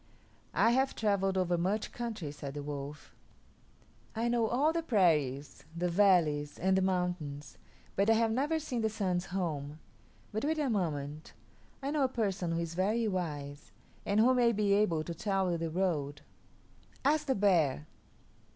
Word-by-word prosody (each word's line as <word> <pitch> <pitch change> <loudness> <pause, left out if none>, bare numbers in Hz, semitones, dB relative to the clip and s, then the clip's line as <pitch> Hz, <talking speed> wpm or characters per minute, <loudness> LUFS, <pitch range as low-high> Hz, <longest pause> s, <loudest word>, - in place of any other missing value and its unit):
"I 230 - +4
have 265 +2 +1
travelled 195 -3 +1
over 175 -2 +1
much 200 +5 -1
country," 220 -11 -5
said 140 -1 -7
the 145 - -4
wolf; 145 0 -7 1.0
"I 230 +2 0
know 235 -2 +2
all 280 +8 +2
the 335 - 0
prairies, 150 - +1
the 175 +1 0
valleys, 170 -6 +3
and 190 +2 +2
the 190 - +3
mountains; 180 -6 -2 0.4
but 200 +3 +2
I - - +7
have 225 0 +2
never 285 +7 +1
seen 260 -7 -3
the 220 - +1
Sun's 190 -4 -1
home. 155 -6 -3 0.5
But 215 - -3
wait 315 +2 0
a 290 -5 0
moment. 155 -6 -3 0.5
I 275 - -1
know 300 -2 +1
a - - +4
person 195 -8 -1
who 165 - -1
is 170 -1 -4
very 215 +6 +1
wise, 150 -7 -4 0.3
and 205 +1 +1
who 245 +4 +5
may 240 -2 +3
be 205 -1 +2
able 180 -6 +2
to 170 - -5
tell 190 +1 0
you 170 - -1
the 165 0 -2
road. 155 -5 -1 0.8
Ask 300 +1 +2
the 265 - +2
bear." 165 - +2
190 Hz, 170 wpm, -31 LUFS, 155-225 Hz, 1.0 s, I